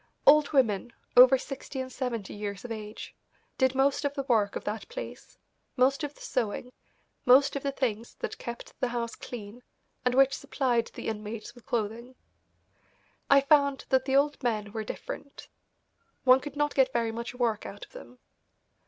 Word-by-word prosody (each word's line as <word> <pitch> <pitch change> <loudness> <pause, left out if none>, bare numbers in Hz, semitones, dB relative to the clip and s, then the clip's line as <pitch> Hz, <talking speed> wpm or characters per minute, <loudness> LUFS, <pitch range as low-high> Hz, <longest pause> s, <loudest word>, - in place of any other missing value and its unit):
Old 300 0 +6
women, 240 -5 +2 0.2
over 255 +2 +9
sixty 270 +1 -7
and 260 0 -4
seventy 240 -6 -4
years 205 +1 -5
of 240 - -6
age, 215 -1 -7 0.5
did 260 -1 +3
most 275 +2 +2
of 285 0 -1
the 275 - -2
work 220 -6 +2
of - - -4
that 210 0 -4
place, - - -8 0.4
most 270 +4 +3
of 290 0 -4
the - - -18
sewing, 250 0 -2 0.5
most 275 +3 +6
of 280 - -2
the 280 - -1
things 235 -4 -2
that - - -5
kept 235 0 -7
the 255 - +1
house 235 -1 -3
clean 225 0 -8 0.4
and 250 0 +1
which 270 0 +5
supplied 240 -4 0
the - - -6
inmates 215 0 -5
with 245 - -18
clothing. 235 +3 -3 1.1
I 280 0 +7
found 280 -1 +3
that 260 0 +3
the 265 0 +1
old 285 +1 +2
men 215 -5 -1
were 220 0 -3
different. 280 +5 -8 0.8
One 255 0 +7
could 290 +1 -8
not 295 0 0
get 265 -2 +3
very 230 -1 0
much 235 +2 -6
work 235 -4 0
out 200 - -9
of - - -30
them. 125 +1 -12
250 Hz, 175 wpm, -28 LUFS, 225-270 Hz, 1.1 s, over